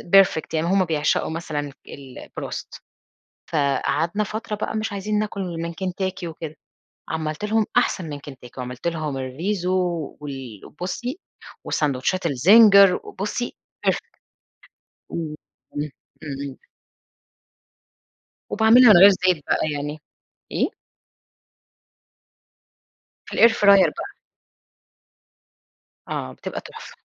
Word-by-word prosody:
perfect 190 Hz, -5 st, +4 dB
يعني 160 Hz, +1 st, 0 dB
هم 190 Hz, +1 st, +3 dB
بيعشقوا 155 Hz, -3 st, 0 dB
مثلًا 155 Hz, -3 st, -4 dB, 0.2 s
ال 135 Hz, -3 st, -10 dB
الBroast -, -, -7 dB, 0.7 s
فقعدنا 160 Hz, +6 st, 0 dB
فترة 215 Hz, +1 st, -4 dB
بقى 215 Hz, -, -4 dB
مش 220 Hz, +1 st, -2 dB
عايزين 205 Hz, +1 st, -1 dB
ناكل 210 Hz, -2 st, -3 dB, 0.2 s
من 170 Hz, 0 st, -4 dB
كنتاكي 185 Hz, 0 st, -3 dB
وكده، 160 Hz, -1 st, -7 dB, 0.5 s
عَملت 155 Hz, +2 st, -3 dB
لهم 215 Hz, 0 st, +2 dB
أحسن 180 Hz, -4 st, +1 dB
من 145 Hz, -, -5 dB
كنتاكي، 130 Hz, -3 st, -11 dB
وعَملت 125 Hz, +4 st, -7 dB
لهم 155 Hz, -4 st, -3 dB
الRiso 170 Hz, +9 st, -3 dB
و 180 Hz, -4 st, -1 dB
وال 135 Hz, -7 st, -8 dB
وبُصي 240 Hz, -, -5 dB, 0.5 s
وساندوتشات 150 Hz, +5 st, 0 dB
الZinger 195 Hz, -, +7 dB
وبُصي 210 Hz, +5 st, -4 dB, 0.3 s
perfect -, -, -1 dB, 0.9 s
وأ 160 Hz, -3 st, -4 dB, 0.4 s
امم، 145 Hz, +1 st, -2 dB, 0.3 s
امم. 140 Hz, -2 st, -6 dB, 2.0 s
وباعملها 225 Hz, +2 st, +7 dB
من -, -, +7 dB
غير 195 Hz, +3 st, +10 dB
زيت 185 Hz, -5 st, +1 dB
بقى 155 Hz, -, +1 dB
يعني 145 Hz, +1 st, -4 dB, 0.5 s
إيه؟ -, -, +1 dB, 2.6 s
في -, -, -12 dB
الair 230 Hz, -, +8 dB
fryer 200 Hz, -3 st, +5 dB
بقى. -, -, -6 dB, 1.9 s
آه، 65 Hz, -, -4 dB
بتبقى -, -, -6 dB
تحفة. -, -, -11 dB
170 Hz, 105 wpm, -23 LUFS, 145-200 Hz, 2.6 s, غير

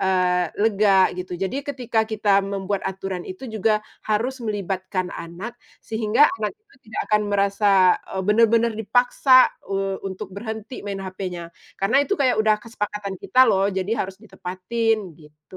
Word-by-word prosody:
eee, 180 Hz, -2 st, +2 dB
lega 205 Hz, -3 st, +4 dB
gitu. 180 Hz, 0 st, -6 dB
Jadi 195 Hz, +9 st, -2 dB
ketika 240 Hz, -6 st, -1 dB
kita 205 Hz, -2 st, +2 dB
membuat 195 Hz, 0 st, -3 dB
aturan 190 Hz, -1 st, -5 dB
itu 185 Hz, +8 st, -8 dB
juga 215 Hz, -2 st, 0 dB, 0.2 s
harus 245 Hz, +5 st, 0 dB
melibatkan 190 Hz, -4 st, -3 dB
anak 175 Hz, +8 st, -8 dB, 0.2 s
sehingga 220 Hz, +4 st, +3 dB, 0.2 s
anak 215 Hz, -, -2 dB
kita 425 Hz, -1 st, -28 dB
tidak 215 Hz, -, -4 dB
akan 210 Hz, 0 st, +4 dB
merasa, 200 Hz, +1 st, +1 dB, 0.5 s
eee, 190 Hz, -, -1 dB
benar-benar 230 Hz, +2 st, +3 dB
dipaksa, 245 Hz, +4 st, +4 dB, 0.2 s
eee, 195 Hz, 0 st, -2 dB
untuk 190 Hz, +1 st, -8 dB
berhenti 220 Hz, +3 st, -6 dB
main 195 Hz, -1 st, -5 dB
hpnya 180 Hz, -3 st, -6 dB, 0.2 s
karena 195 Hz, +6 st, +1 dB
itu 345 Hz, +8 st, 0 dB
kayak 255 Hz, -6 st, +2 dB
udah 215 Hz, -1 st, +3 dB
kesepakatan 210 Hz, -3 st, -4 dB
kita 255 Hz, +1 st, +5 dB
loh, 195 Hz, -4 st, +3 dB
jadi 190 Hz, +2 st, -2 dB
harus 190 Hz, 0 st, -4 dB
ditepatin, 205 Hz, +3 st, -2 dB, 0.2 s
gitu. 150 Hz, +3 st, -16 dB
205 Hz, 145 wpm, -23 LUFS, 190-225 Hz, 0.5 s, kita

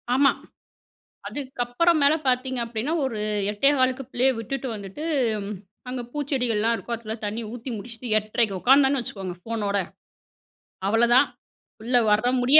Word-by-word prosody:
ஆமா. 275 Hz, +1 st, +6 dB, 1.0 s
அதுக்கப்புறமேல 285 Hz, +3 st, +2 dB
பாத்தீங்க 255 Hz, 0 st, +1 dB
அப்பிடின்னா, 230 Hz, +6 st, -3 dB
ஒரு 240 Hz, -5 st, -2 dB, 0.3 s
8:15க்கு 260 Hz, +3 st, +2 dB
பிள்ளைய 260 Hz, +2 st, +3 dB
விட்டுட்டு 265 Hz, +4 st, -4 dB
வந்துட்டு, 200 Hz, +8 st, -7 dB, 0.8 s
அங்க 250 Hz, 0 st, -3 dB
பூச்செடிகள் 265 Hz, -6 st, 0 dB
எல்லாம் 225 Hz, +2 st, +2 dB
இருக்கும், 235 Hz, 0 st, -4 dB
அதுல 220 Hz, -1 st, -5 dB
தண்ணீ 215 Hz, +3 st, -3 dB
ஊத்தி 245 Hz, +2 st, -6 dB
முடிச்சுட்டு, 230 Hz, +2 st, -6 dB
8:30 215 Hz, -2 st, 0 dB
உக்காந்தேன்னு 270 Hz, +1 st, +5 dB
வச்சுக்கோங்க 190 Hz, -6 st, -5 dB
ஃபோனோட, 205 Hz, -2 st, -1 dB, 1.1 s
அவ்வளவுதான் 235 Hz, +5 st, +5 dB, 0.5 s
பிள்ளை 245 Hz, +2 st, +3 dB
வர்ற 215 Hz, +3 st, +3 dB
முடிய, 265 Hz, +5 st, +8 dB
245 Hz, 120 wpm, -24 LUFS, 220-265 Hz, 1.1 s, முடிய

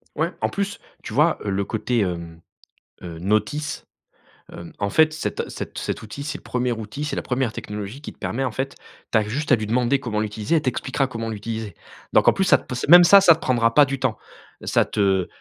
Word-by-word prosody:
Ouais. 160 Hz, +3 st, 0 dB
En -, -, +1 dB
plus, 200 Hz, 0 st, -3 dB, 0.2 s
tu 110 Hz, -, -7 dB
vois, 150 Hz, +6 st, +3 dB
heu, -, -, -1 dB
le 100 Hz, +1 st, 0 dB
côté, 115 Hz, +3 st, -1 dB
hem, 85 Hz, -3 st, -3 dB, 0.6 s
heu, 85 Hz, -2 st, -8 dB
notice, 110 Hz, -, -1 dB, 0.7 s
hem, 85 Hz, -, -9 dB
en 100 Hz, -, 0 dB
fait, 155 Hz, +6 st, +4 dB
cet 155 Hz, -, -4 dB
cet -, -, -7 dB
cet -, -, -3 dB
outil, 110 Hz, +6 st, -7 dB
c'est 145 Hz, -, -4 dB
le -, -, -18 dB
1er 125 Hz, 0 st, -1 dB
outil, 110 Hz, +5 st, -5 dB
c'est 150 Hz, -, -3 dB
la -, -, -2 dB
1re 125 Hz, -2 st, -1 dB
technologie 105 Hz, +6 st, -7 dB
qui -, -, -8 dB
te -, -, -32 dB
permet, 135 Hz, +4 st, -3 dB
en 130 Hz, -, -1 dB
fait, 135 Hz, +4 st, -4 dB, 0.4 s
tu -, -, +4 dB
as 110 Hz, -, +3 dB
juste 140 Hz, +8 st, -3 dB
à -, -, +8 dB
lui 110 Hz, -2 st, -4 dB
demander 125 Hz, +4 st, +1 dB
comment 115 Hz, -5 st, -3 dB
l'utiliser, 105 Hz, +6 st, -1 dB
elle 155 Hz, -, +3 dB
t'expliquera 130 Hz, +1 st, -1 dB
comment 115 Hz, -3 st, -5 dB
l'utiliser. 110 Hz, -2 st, -5 dB, 0.4 s
Donc, -, -, +4 dB
en -, -, +7 dB
plus, 195 Hz, -, 0 dB
ça 185 Hz, -, +6 dB
t -, -, -15 dB
p 125 Hz, -, -4 dB
c 125 Hz, -, -3 dB
même 175 Hz, +2 st, +10 dB
ça, 200 Hz, +3 st, +8 dB
ça 165 Hz, -4 st, +7 dB
te -, -, -16 dB
prendra 115 Hz, -2 st, +2 dB
pas 145 Hz, -1 st, +7 dB
du 135 Hz, 0 st, -4 dB
temps. 125 Hz, -5 st, -1 dB, 0.5 s
Ça -, -, +2 dB
te 95 Hz, -3 st, +1 dB
120 Hz, 235 wpm, -22 LUFS, 105-145 Hz, 0.7 s, même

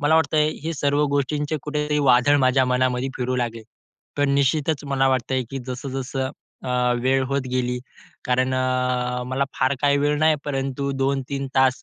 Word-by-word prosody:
मला 145 Hz, +2 st, +3 dB
वाटतंय, 155 Hz, -1 st, +3 dB
हे 165 Hz, -, -1 dB
सर्व 145 Hz, +1 st, +1 dB
गोष्टींचे 145 Hz, +2 st, -1 dB
कुठेतरी 150 Hz, 0 st, -1 dB
वादळ 135 Hz, 0 st, +4 dB
माझ्या 130 Hz, 0 st, +3 dB
मनामध्ये 125 Hz, 0 st, +1 dB
फिरू 130 Hz, 0 st, -1 dB
लागले. 115 Hz, -2 st, -2 dB, 0.6 s
तर 145 Hz, -, +3 dB
निश्चितच 140 Hz, +2 st, +1 dB
मला 135 Hz, -1 st, +2 dB
वाटतंय, 130 Hz, 0 st, 0 dB
की 135 Hz, -, -4 dB
जसं-जसं 130 Hz, +1 st, -4 dB, 0.3 s
अ, 130 Hz, -, -3 dB, 0.3 s
वेळ 130 Hz, +1 st, +2 dB
होत 140 Hz, 0 st, 0 dB
गेली, 125 Hz, -1 st, -1 dB, 0.5 s
कारण 130 Hz, +1 st, +1 dB
अ, 125 Hz, -1 st, 0 dB
मला 130 Hz, +2 st, 0 dB
फार 130 Hz, +2 st, +2 dB
काही 140 Hz, 0 st, +4 dB
वेळ 145 Hz, +1 st, +1 dB
नाही 155 Hz, 0 st, +4 dB
परंतु 135 Hz, -1 st, -2 dB
2-3 135 Hz, 0 st, -1 dB
तास 130 Hz, -1 st, +3 dB
135 Hz, 155 wpm, -23 LUFS, 130-145 Hz, 0.6 s, वादळ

